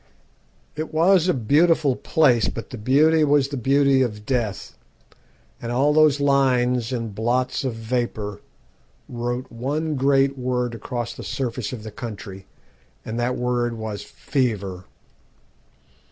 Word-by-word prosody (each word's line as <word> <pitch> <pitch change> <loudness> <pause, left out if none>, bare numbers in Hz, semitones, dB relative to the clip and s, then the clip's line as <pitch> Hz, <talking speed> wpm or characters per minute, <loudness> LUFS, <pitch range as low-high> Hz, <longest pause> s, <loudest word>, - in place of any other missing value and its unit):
It 155 +1 -4
was 170 +2 +4
a 180 - +3
beautiful 145 +3 +3
place, 135 -4 +2
but 115 - -7
the 125 - -6
beauty 155 +7 +4
was 145 -2 +3
the 140 - -4
beauty 135 +1 +3
of 105 -4 -2
death; 115 -6 -2 0.9
and 115 - -4
all 140 +5 +2
those 155 -2 +4
lines 125 -4 +2
and 115 -4 -3
blots 120 +6 0
of 130 -4 -2
vapour 110 -3 -3 0.7
wrote 120 +1 -4
one 145 +7 -2
great 135 0 +2
word 125 -1 -1
across 120 +1 -4
the - - -10
surface 125 -3 -3
of 120 -4 -7
the 110 - -7
country, 100 -3 -8 0.6
and 115 +2 -4
that 125 +1 0
word 120 -1 -1
was 110 -2 -5
'fever.' 100 -9 -3
125 Hz, 135 wpm, -23 LUFS, 115-140 Hz, 0.9 s, was